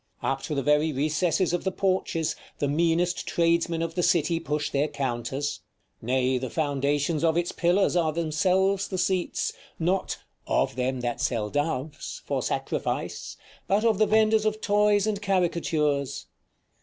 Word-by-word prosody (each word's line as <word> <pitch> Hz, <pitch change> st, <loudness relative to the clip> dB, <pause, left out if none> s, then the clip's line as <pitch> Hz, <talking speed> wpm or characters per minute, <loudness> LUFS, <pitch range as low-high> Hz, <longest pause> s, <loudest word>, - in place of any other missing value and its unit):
Up 135 Hz, +2 st, 0 dB
to 150 Hz, -, -4 dB
the 140 Hz, -, -1 dB
very 150 Hz, +3 st, +3 dB
recesses 155 Hz, +5 st, +1 dB
of 175 Hz, -, -1 dB
the 190 Hz, -, 0 dB
porches, 185 Hz, -4 st, 0 dB, 0.2 s
the 145 Hz, -, 0 dB
meanest 170 Hz, +4 st, +1 dB
tradesmen 170 Hz, 0 st, +1 dB
of 165 Hz, 0 st, -3 dB
the 175 Hz, -, 0 dB
city 165 Hz, -1 st, +2 dB
push 150 Hz, -2 st, -2 dB
their 140 Hz, +2 st, +1 dB
counters; 135 Hz, +2 st, -3 dB, 0.4 s
nay, 130 Hz, +1 st, +1 dB
the 130 Hz, 0 st, -4 dB
foundations 145 Hz, +1 st, 0 dB
of 165 Hz, 0 st, +3 dB
its 175 Hz, 0 st, 0 dB
pillars 180 Hz, +2 st, +2 dB
are 165 Hz, -3 st, +2 dB
themselves 185 Hz, +5 st, +1 dB
the 185 Hz, -, -4 dB
seats 180 Hz, 0 st, 0 dB, 0.2 s
not 180 Hz, +3 st, 0 dB, 0.3 s
"of -, -, +1 dB
them 130 Hz, 0 st, -1 dB
that 120 Hz, -1 st, -2 dB
sell 110 Hz, -4 st, -1 dB
doves" 145 Hz, 0 st, -3 dB
for -, -, -1 dB
sacrifice, -, -, -3 dB, 0.3 s
but 205 Hz, +3 st, +2 dB
of 220 Hz, -3 st, +3 dB
the 215 Hz, -, +4 dB
vendors 220 Hz, 0 st, +4 dB
of 215 Hz, 0 st, 0 dB
toys 205 Hz, -1 st, +3 dB
and 210 Hz, -2 st, -1 dB
caricatures. 165 Hz, -7 st, 0 dB
165 Hz, 155 wpm, -26 LUFS, 145-185 Hz, 0.4 s, the